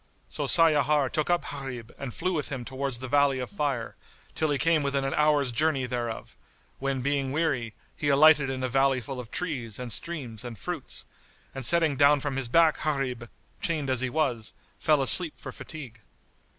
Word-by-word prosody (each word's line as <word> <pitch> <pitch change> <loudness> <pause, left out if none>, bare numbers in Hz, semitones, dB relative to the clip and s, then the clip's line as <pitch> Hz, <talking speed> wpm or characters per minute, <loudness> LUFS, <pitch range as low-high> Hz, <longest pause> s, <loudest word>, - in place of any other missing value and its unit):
So - - -3
Sayyar 150 -4 +3
took 155 +1 -1
up 175 0 +1
Gharib 125 -5 -7
and 135 -3 -6
flew 185 +9 -2
with 150 -4 -2
him 130 -3 -4
towards 135 -1 -2
the 130 +2 -6
Valley 140 0 +3
of 125 - -5
Fire, 140 - -2 0.4
till 155 - 0
he 145 - +1
came 165 +3 +2
within 140 -1 -1
an 135 - -1
hour's 150 -3 +2
journey 145 0 +1
thereof, 120 -2 -5 0.4
when 135 -1 -2
being 140 -1 0
weary, 130 -8 -1 0.2
he 145 - -1
alighted 145 0 +6
in 130 -1 -3
a - - +1
valley 135 +1 +2
full 130 +2 -7
of 120 -3 -8
trees 125 - -4
and 125 -2 -2
streams 130 -11 -4
and 120 -3 -7
fruits, 90 - -5 0.5
and 135 - -6
setting 160 0 +3
down 145 +1 +5
from 140 -1 -3
his 135 -2 -1
back 160 +5 +3
Gharib 130 -6 -2 0.3
chained 150 -5 -1
as 130 -2 +2
he 130 - -1
was, 125 -7 -1 0.3
fell 150 -3 +3
asleep 165 +4 +5
for 135 - -8
fatigue. 125 -7 -10
135 Hz, 190 wpm, -27 LUFS, 125-150 Hz, 0.5 s, alighted